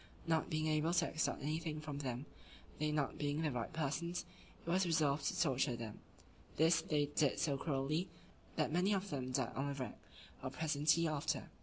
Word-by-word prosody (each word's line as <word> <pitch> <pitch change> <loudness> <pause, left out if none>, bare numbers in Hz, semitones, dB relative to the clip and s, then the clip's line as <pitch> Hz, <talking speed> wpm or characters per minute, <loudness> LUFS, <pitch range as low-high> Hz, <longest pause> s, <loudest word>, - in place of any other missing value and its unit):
Not 165 -1 +1
being 155 0 0
able 155 +2 +2
to 170 -1 +4
extort 155 -3 -1
anything 155 +1 -2
from 150 -2 -5
them, 130 -1 -3 0.5
they 150 0 +1
not 150 -2 0
being 145 +2 0
the 155 - +1
right 120 -2 -2
persons, 165 +3 -1 0.4
it - - -18
was 185 +3 +3
resolved 155 -4 +2
to 180 - -1
torture 135 -5 +2
them: 115 -2 -6 0.6
this 165 +1 +5
they 150 -3 +1
did 145 -1 +1
so 145 -4 +1
cruelly, 145 +4 0 0.5
that 155 -1 +1
many 185 +4 +3
of 195 0 -3
them 130 -3 -2
died 130 -2 0
on 135 +1 0
the 140 - -2
rack, 130 -2 -5 0.4
or - - -2
presently 155 +1 +2
after. 150 -2 -1
150 Hz, 185 wpm, -38 LUFS, 140-165 Hz, 0.6 s, this